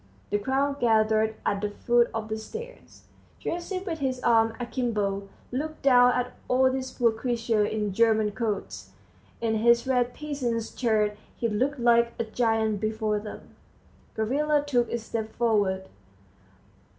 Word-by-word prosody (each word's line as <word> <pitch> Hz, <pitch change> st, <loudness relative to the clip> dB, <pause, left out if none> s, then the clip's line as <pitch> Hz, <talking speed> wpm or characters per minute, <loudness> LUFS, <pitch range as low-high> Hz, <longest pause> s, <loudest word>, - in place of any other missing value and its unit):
The 205 Hz, -, +2 dB
crowd 275 Hz, +5 st, 0 dB
gathered 220 Hz, -1 st, +3 dB
at 200 Hz, -, 0 dB
the 210 Hz, -, -1 dB
foot 240 Hz, +3 st, +2 dB
of 225 Hz, -1 st, -4 dB
the 220 Hz, -, -2 dB
stairs. 475 Hz, -, -10 dB, 0.4 s
Gerasim, 370 Hz, +2 st, -4 dB
with 330 Hz, -5 st, -3 dB
his 260 Hz, -2 st, -1 dB
arms 225 Hz, -1 st, +3 dB
akimbo, 215 Hz, -5 st, -2 dB, 0.2 s
looked 310 Hz, +5 st, -4 dB
down 250 Hz, -2 st, +6 dB
at 250 Hz, 0 st, -2 dB
all 260 Hz, +1 st, +3 dB
these 260 Hz, 0 st, -3 dB
poor 240 Hz, -3 st, +2 dB
creatures 225 Hz, -2 st, 0 dB
in 210 Hz, -2 st, -2 dB
German 220 Hz, 0 st, +3 dB
coats; 215 Hz, -1 st, -4 dB, 0.5 s
in 225 Hz, -1 st, +1 dB
his 235 Hz, +2 st, +4 dB
red 250 Hz, -2 st, +1 dB
peasant's 255 Hz, -7 st, -3 dB
shirt 215 Hz, -4 st, +1 dB, 0.2 s
he 235 Hz, -, 0 dB
looked 260 Hz, +7 st, 0 dB
like 235 Hz, 0 st, +3 dB
a -, -, 0 dB
giant 220 Hz, -2 st, 0 dB
before 215 Hz, -1 st, -1 dB
them. 210 Hz, 0 st, -9 dB, 0.7 s
Gavrila 290 Hz, +7 st, +1 dB
took 245 Hz, -4 st, +1 dB
a -, -, 0 dB
step 220 Hz, -1 st, -5 dB
forward. 205 Hz, -5 st, +1 dB
235 Hz, 145 wpm, -27 LUFS, 220-255 Hz, 0.7 s, down